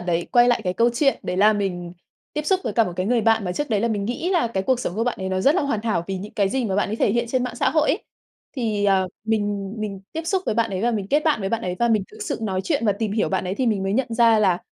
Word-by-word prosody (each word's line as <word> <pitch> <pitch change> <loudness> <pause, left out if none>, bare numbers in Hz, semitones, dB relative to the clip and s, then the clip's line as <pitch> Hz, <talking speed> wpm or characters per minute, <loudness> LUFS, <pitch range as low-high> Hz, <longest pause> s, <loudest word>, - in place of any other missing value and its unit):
đấy, 175 -1 -1
quay 240 -1 +6
lại 240 - +2
cái 180 - 0
câu 235 +3 +3
chuyện 275 +2 +2
đấy 180 - -3
là 210 +3 +5
mình 180 -4 -3 0.4
tiếp 300 - -2
xúc 380 -1 +2
với - - -2
cả 225 +2 +3
một 180 - -4
cái 185 +1 -1
người 240 +1 +2
bạn 225 -1 +2
mà 180 - -2
trước 290 +6 -3
đấy 210 - +2
là 235 - +1
mình 205 -3 -1
nghĩ 245 - -2
là 340 -10 +2
cái 195 -4 -2
cuộc 250 +4 +1
sống 175 - -3
của 225 +3 0
bạn 245 - -2
ấy 190 - -2
nó 185 0 -1
rất 280 +10 +4
là 370 - +1
hoàn 280 -7 -1
thảo 210 -7 -1
vì 195 - -3
những 205 +3 -8
cái 200 -2 +2
gì 255 +5 -1
mà 195 -4 -1
bạn 205 - +1
ấy 215 - -3
thể - - +2
hiện 235 +1 0
trên 255 0 0
mạng 250 -2 -4
xã - - +2
hội 310 -1 +2
ấy. 340 +10 -1 0.5
Thì, 215 -4 -1
à, 195 -1 +3 0.2
mình 205 -2 -1
mình 200 -3 -4
tiếp 325 - -3
xúc 380 +1 0
với - - 0
bạn 230 -1 +1
ấy 185 - -3
và 240 - +2
mình 205 -4 -2
kết 295 +2 +2
bạn 305 -8 +2
với 195 - -2
bạn 230 +2 -2
ấy, 180 -3 -3
và 235 - +2
mình 220 -3 +2
thực - - -13
sự - - -3
nói 190 -3 -1
chuyện 280 -8 0
và 205 - +4
tìm 210 0 -3
hiểu 215 - +1
bạn 190 -1 -1
ấy 185 +1 -2
thì 255 +4 -1
mình 210 -4 +1
mới 195 +1 -1
nhận 260 +3 +1
ra 230 -1 +5
là, 190 -4 +3
220 Hz, 335 wpm, -23 LUFS, 195-240 Hz, 0.5 s, quay